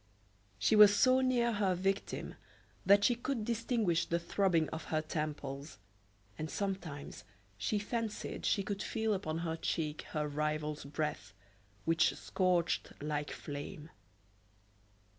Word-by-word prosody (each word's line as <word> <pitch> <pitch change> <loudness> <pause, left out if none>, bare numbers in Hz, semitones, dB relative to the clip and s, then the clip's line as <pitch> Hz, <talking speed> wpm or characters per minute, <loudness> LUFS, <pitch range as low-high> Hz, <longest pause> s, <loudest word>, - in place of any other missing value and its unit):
She 220 - +3
was 210 -1 +9
so 255 +4 +5
near 245 -2 +2
her 200 -4 +1
victim 195 +2 -2 0.5
that 200 +1 +7
she 245 - +5
could 240 -1 -3
distinguish 225 -7 +1
the 170 - +1
throbbing 170 -2 +1
of 160 - -6
her 155 - 0
temples, 150 -2 -4 0.6
and 155 0 -3
sometimes 175 - -4 0.3
she 110 - -1
fancied 220 +1 -3
she 200 - +2
could 200 0 -3
feel 220 -1 0
upon 165 -5 -2
her 160 -1 -1
cheek 155 -2 -2
her 150 -1 0
rival's 150 0 -2
breath, 140 - -3 0.5
which 165 -1 +3
scorched 180 -2 0
like 150 -1 -2
flame. 145 +2 -7
170 Hz, 125 wpm, -34 LUFS, 150-210 Hz, 0.6 s, was